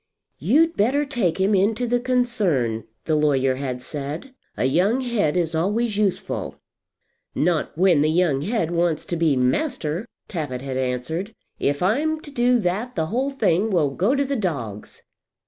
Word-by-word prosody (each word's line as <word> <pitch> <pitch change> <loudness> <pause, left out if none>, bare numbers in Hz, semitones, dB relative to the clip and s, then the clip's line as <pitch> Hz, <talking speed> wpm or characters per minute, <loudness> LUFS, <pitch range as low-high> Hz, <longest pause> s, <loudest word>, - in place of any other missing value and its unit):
"You'd 305 - +3
better 270 +8 +2
take 225 - -1
him 195 +2 +2
into 210 +5 +2
the 245 +1 +1
concern," 210 - 0 0.2
the 160 - 0
lawyer 135 -4 +2
had 130 -2 -4
said. 150 - -6 0.2
"A - - +1
young 190 - +2
head 215 -11 0
is 165 -2 0
always 205 +7 0
useful." 205 -3 -1 0.8
"Not 160 -2 0
when 175 -4 +4
the 155 - +3
young 160 -4 +2
head 185 -1 -1
wants 170 -2 0
to 175 - -3
be 160 -4 +2
master," 160 - -1 0.2
Tappitt 145 -8 -4
had 135 -1 -4
answered. 130 - -3 0.2
"If 145 +3 0
I'm 300 +11 +1
to 290 - -11
do 245 -1 +3
that 205 +7 -2
the 160 -3 0
whole 265 +3 +1
thing 215 -6 +1
will 165 -8 +2
go 195 - +1
to 280 0 +1
the 275 +1 -2
dogs." 135 - -4
180 Hz, 165 wpm, -23 LUFS, 150-240 Hz, 0.8 s, when